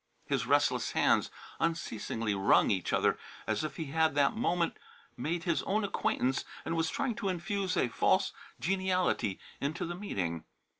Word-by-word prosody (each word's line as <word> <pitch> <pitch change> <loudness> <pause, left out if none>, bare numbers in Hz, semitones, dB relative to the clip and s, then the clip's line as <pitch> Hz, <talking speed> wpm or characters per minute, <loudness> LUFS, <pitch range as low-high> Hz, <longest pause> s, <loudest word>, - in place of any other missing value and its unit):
His - - -1
restless - - +2
hands - - +3 0.3
unceasingly 115 -9 -1
wrung 95 0 +4
each 95 -3 0
other - - +2 0.3
as - - 0
if 155 -3 -3
he 160 - -4
had 160 -1 +2
that 140 +5 +3
moment 175 -7 0 0.4
made 165 +2 -2
his 170 -1 +1
own 210 +2 0
acquaintance 135 -9 0 0.2
and 165 - -1
was 165 -1 +1
trying 245 - -1
to 205 -4 -1
infuse 190 +1 -1
a - - +3
false 115 - +2 0.3
geniality 185 - +1 0.2
into 150 +4 -2
the 175 - -4
meeting. 90 - -3
165 Hz, 155 wpm, -31 LUFS, 130-185 Hz, 0.4 s, wrung